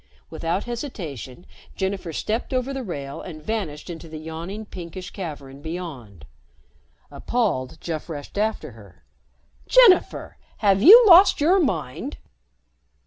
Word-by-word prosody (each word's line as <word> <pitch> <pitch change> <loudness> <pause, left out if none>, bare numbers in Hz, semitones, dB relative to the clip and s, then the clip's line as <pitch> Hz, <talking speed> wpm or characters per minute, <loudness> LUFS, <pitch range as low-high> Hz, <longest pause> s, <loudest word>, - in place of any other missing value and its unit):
Without 165 +4 -2
hesitation, 175 - -7 0.3
Jennifer 190 -3 -3
stepped 225 - -3
over 255 +2 -1
the 270 - -4
rail 140 - -6
and 160 -4 -9
vanished 160 -4 -4
into 165 -2 -8
the 155 - -8
yawning 165 +7 -7
pinkish 180 -1 -9
cavern 145 -7 -8
beyond. 145 - -8 0.9
Appalled, 170 - -2
Jeff 160 -1 -5
rushed 145 -3 -8
after 220 +1 -2
her. - - -17 0.6
"Jennifer! 485 -7 +4 0.2
Have 195 -2 +2
you 450 - +10
lost 375 0 +7
your 345 +7 +4
mind?" 185 - -2
180 Hz, 120 wpm, -23 LUFS, 155-230 Hz, 0.9 s, you